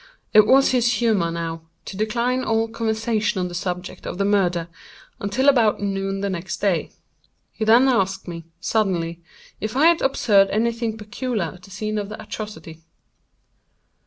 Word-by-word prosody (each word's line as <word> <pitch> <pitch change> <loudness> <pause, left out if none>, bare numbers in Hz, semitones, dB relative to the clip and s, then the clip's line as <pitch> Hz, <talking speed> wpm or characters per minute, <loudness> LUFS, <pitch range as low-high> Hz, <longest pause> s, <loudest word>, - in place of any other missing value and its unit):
It 215 -1 +7
was 270 +3 +5
his 245 -2 +2
humor, 210 -6 +1
now, 165 -1 -4 0.2
to - - -7
decline 235 +5 0
all 225 0 +1
conversation 220 -2 -1
on 180 0 -1
the - - -9
subject 180 0 -5
of - - -5
the 200 - 0
murder, 180 -5 +1 0.5
until 220 +7 0
about 235 -7 +4
noon 195 -1 -2
the 200 - -1
next 180 -2 -4
day. 195 -5 0 0.6
He 220 - -3
then 235 +4 +6
asked 195 -7 0
me, 170 -2 -7
suddenly, 175 -6 -1 0.4
if 215 +3 -4
I 295 - +5
had 335 0 +5
observed 205 -7 +3
any 230 +3 +1
thing 230 -1 -3
peculiar 210 - -3
at 180 - -16
the 185 - -15
scene 215 +2 -3
of 205 -1 -5
the 215 - -8
atrocity. 165 -7 -8
210 Hz, 165 wpm, -22 LUFS, 185-230 Hz, 0.6 s, It